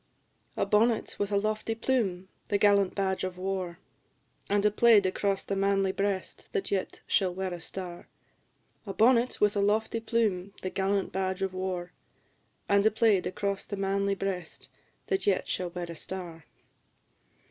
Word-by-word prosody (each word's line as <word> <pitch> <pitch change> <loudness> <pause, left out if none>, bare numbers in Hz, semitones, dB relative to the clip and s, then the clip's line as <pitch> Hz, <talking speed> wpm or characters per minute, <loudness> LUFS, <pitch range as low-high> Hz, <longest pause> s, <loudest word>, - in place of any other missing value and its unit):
"A - - +2
bonnet 215 +3 +2
with 205 0 -1
a 200 - +3
lofty 215 +2 -1
plume, 220 -7 0 0.2
the 205 - +2
gallant 200 -2 +4
badge 190 -1 0
of 185 -1 -3
war, 185 -2 -3 0.7
And 205 +1 +2
a 210 - +5
plaid 215 -2 +5
across 195 +1 0
the 200 - -2
manly 195 0 +2
breast 195 -1 -3
that 410 -3 -1
yet 195 -2 -2
shall 190 -3 +2
wear 185 0 -3
a 175 - -6
star; 175 +1 -6 0.8
A 195 - -5
bonnet 240 +3 +4
with 210 0 +3
a 200 - +2
lofty 220 +3 +1
plume, 210 -5 -1
the 185 - -2
gallant 195 0 0
badge 190 0 -1
of 190 -1 -2
war, 185 -1 -3 0.8
And 200 0 +4
a - - +6
plaid 220 -3 +2
across 200 +1 -3
the 200 - -4
manly 195 0 0
breast 190 -4 -4 0.4
that 390 - -1
yet 195 -2 +2
shall 180 -1 -2
wear 175 0 -5
a 170 - -6
star." 170 -3 -7
195 Hz, 165 wpm, -29 LUFS, 185-210 Hz, 0.8 s, a